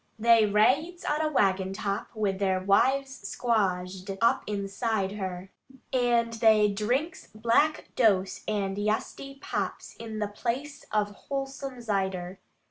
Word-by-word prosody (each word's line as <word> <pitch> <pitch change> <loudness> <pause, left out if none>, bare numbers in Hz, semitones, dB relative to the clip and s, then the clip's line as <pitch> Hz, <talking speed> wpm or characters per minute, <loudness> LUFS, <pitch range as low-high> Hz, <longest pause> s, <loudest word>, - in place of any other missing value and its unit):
They 225 -1 +5
raides 285 - +2
on 300 +1 +1
a 310 -1 0
waggon 190 -6 +1
top 200 +1 -3
with 200 -3 -1
their 190 -2 +1
wives 265 +7 +2
squazed 190 -5 -1
up 230 - +3
inside 200 0 -1
her, 190 -2 -5 0.4
And 240 -2 +2
they 220 -2 +4
drinks 250 - -1
black 235 +8 +1
dose 195 -5 +2
and 200 -2 -1
yesty 215 +6 -2
pops - - -4
in 220 -1 -7
the 210 -1 -1
place 250 +7 -4
of 210 -1 +1
wholesome 270 +2 -5
zider. 190 -4 -2
215 Hz, 130 wpm, -28 LUFS, 195-245 Hz, 0.4 s, They